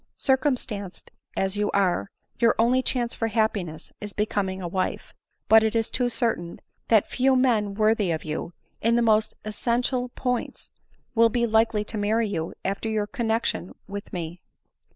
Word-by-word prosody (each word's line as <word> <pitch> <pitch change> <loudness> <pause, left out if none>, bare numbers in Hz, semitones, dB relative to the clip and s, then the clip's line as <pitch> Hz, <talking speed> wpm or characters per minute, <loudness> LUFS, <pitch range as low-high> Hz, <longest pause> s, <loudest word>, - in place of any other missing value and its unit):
Circumstanced 250 -8 -1 0.3
as 190 +1 0
you 205 0 +1
are, 195 -1 +1 0.3
your 230 -1 +4
only 245 +3 +4
chance 245 -2 -1
for 225 - -1
happiness 205 -8 -1
is 210 -1 -6
becoming 200 -3 -1
a 180 - -4
wife; 185 +2 -2 0.3
but 220 0 +8
it 220 +1 0
is 225 0 0
too 250 -1 +1
certain 225 -9 -2 0.3
that 220 -3 +5
few 265 +1 +3
men 225 -6 +2
worthy 215 -2 +2
of 160 -2 -1
you, 155 +2 -4 0.3
in 230 +1 +3
the 240 - +3
most 215 -1 +3
essential 245 +3 -1
points, 250 -2 -3 0.4
will 230 0 +5
be 235 +1 +1
likely 220 -1 +2
to 215 0 -4
marry 220 +2 +1
you 165 -5 -3
after 195 +3 -1
your 215 -1 0
connexion 225 -4 -1
with 200 +1 -7
me." 175 -1 -5
220 Hz, 160 wpm, -25 LUFS, 200-235 Hz, 0.4 s, but